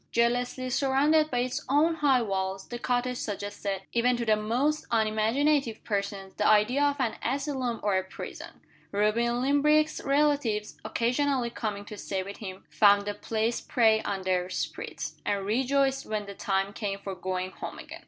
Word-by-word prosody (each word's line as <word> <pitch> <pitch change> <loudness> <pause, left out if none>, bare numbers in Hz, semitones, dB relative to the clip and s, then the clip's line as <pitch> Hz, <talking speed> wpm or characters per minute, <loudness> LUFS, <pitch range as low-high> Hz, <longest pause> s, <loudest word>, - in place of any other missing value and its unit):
Jealously 245 +2 +1
surrounded 290 +4 +3
by 245 - -2
its 250 0 -2
own 300 +5 +4
high 270 -5 +3
walls, 190 -2 -2
the 240 - -5
cottage 250 0 0
suggested, 205 -2 -4
even 245 +1 +3
to 235 - -2
the 215 -1 +4
most 245 +9 0
unimaginative 230 +4 +1
persons, 200 -2 -3
the 210 - +2
idea 215 +6 +4
of 285 -1 +3
an 240 -4 0
asylum 260 -2 -2
or 205 -2 +2
a 190 - +1
prison. 190 - -9 0.3
Reuben 235 +4 +1
Limbrick's 300 +3 +3
relatives, 275 -7 +1
occasionally 250 0 0
coming 205 -3 -4
to 210 - -9
stay 190 -1 -3
with 200 +2 -8
him, 190 -3 -8
found 205 -1 +5
the 205 - -2
place 220 +2 -1
prey 220 -2 +3
on 195 -2 -3
their 185 -1 0
spirits, 150 -2 -5
and 200 -1 -1
rejoiced 270 +4 +1
when 215 -1 -2
the 200 - -8
time 195 0 -1
came 205 -3 -3
for 200 -1 -6
going 185 0 -3
home - - -7
again. - - -9
225 Hz, 165 wpm, -28 LUFS, 200-265 Hz, 0.3 s, found